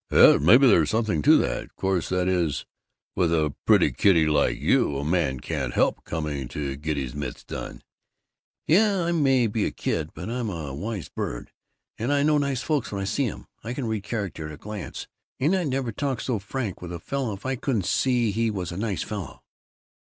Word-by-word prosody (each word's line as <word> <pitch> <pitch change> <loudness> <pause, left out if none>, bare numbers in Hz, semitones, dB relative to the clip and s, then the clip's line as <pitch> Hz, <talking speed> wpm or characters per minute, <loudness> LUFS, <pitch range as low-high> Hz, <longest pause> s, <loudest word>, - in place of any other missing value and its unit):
'" - - -58
"Yes, - - +7
maybe 120 - +7
there's 85 - +5
something 110 -8 0
to - - +6
that. - - -2
Course, 95 -2 -1
that 90 0 0
is 85 -7 0 0.5
with 90 -3 +2
a 75 -3 +1
pretty - - +5
kiddy 85 -6 +4
like 75 -2 +2
you, 70 - +2
a 70 - -3
man 75 -6 +1
can't - - -3
help - - +2
coming 75 -5 -3
to 70 +1 -4
get 75 +1 -3
his 65 -3 -3
mitts 70 -4 -5
done." - - -7 0.8
"Yeh, 200 +5 +4
I 170 - 0
may 135 -7 +3
be 110 -1 0
a - - 0
kid, 80 -2 -2
but 85 +5 -6
I'm 120 -1 -2
a 80 -7 -5
wise 100 +5 -4
bird, - - -5 0.5
and 120 +5 -1
I 145 0 +3
know 150 0 +3
nice 140 -3 -1
folks 150 -6 -1
when 100 - -3
I - - -2
see 120 +6 0
um - - -11 0.2
I 120 +2 -4
can 135 - -3
read 110 -2 -2
character 100 -7 -4
at 75 - -8
a - - -9
glance 105 0 -7 0.3
and 155 +8 +2
I'd 180 -4 0
never 130 -3 -1
talk 135 +3 -2
so 120 -5 -1
frank 105 0 -4
with 90 -1 -7
a 85 - -5
fellow 130 +4 -3
if 100 +3 -10
I 130 0 0
couldn't 120 -6 -1
see 120 0 +2
he 115 +2 0
was 95 -5 -4
a 85 - -6
nice 105 -2 -2
fellow." 100 -4 -7
100 Hz, 210 wpm, -25 LUFS, 80-125 Hz, 0.8 s, Yes